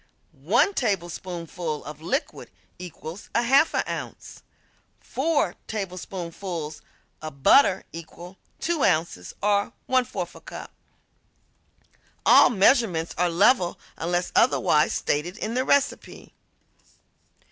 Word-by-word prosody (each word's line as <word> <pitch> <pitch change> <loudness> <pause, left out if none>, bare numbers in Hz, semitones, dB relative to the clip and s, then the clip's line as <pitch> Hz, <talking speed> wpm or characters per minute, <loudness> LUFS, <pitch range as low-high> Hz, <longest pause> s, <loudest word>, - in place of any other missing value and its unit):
One 400 - +1
tablespoonful 175 - -3
of 150 +1 -9
liquid 265 - -3 0.3
equals 180 +1 -9
1/2 265 +6 +3
ounce. - - -7 0.6
Four 285 - 0
tablespoonfuls 180 -5 -5 0.4
of 140 -3 -9
butter 195 -9 +5
equal 170 +3 -10 0.2
2 335 -4 0
ounces 155 - 0
or 205 0 +1
1/4 255 -1 -1
cup. - - -9 1.5
All - - +7
measurements 195 -6 +2
are 175 +1 +1
level 180 +2 +3 0.2
unless 175 +2 -2
otherwise 180 -10 +3
stated 170 +7 -2
in 225 0 -4
the 255 +1 +1
recipe. 280 +1 -1
180 Hz, 95 wpm, -25 LUFS, 165-235 Hz, 1.5 s, All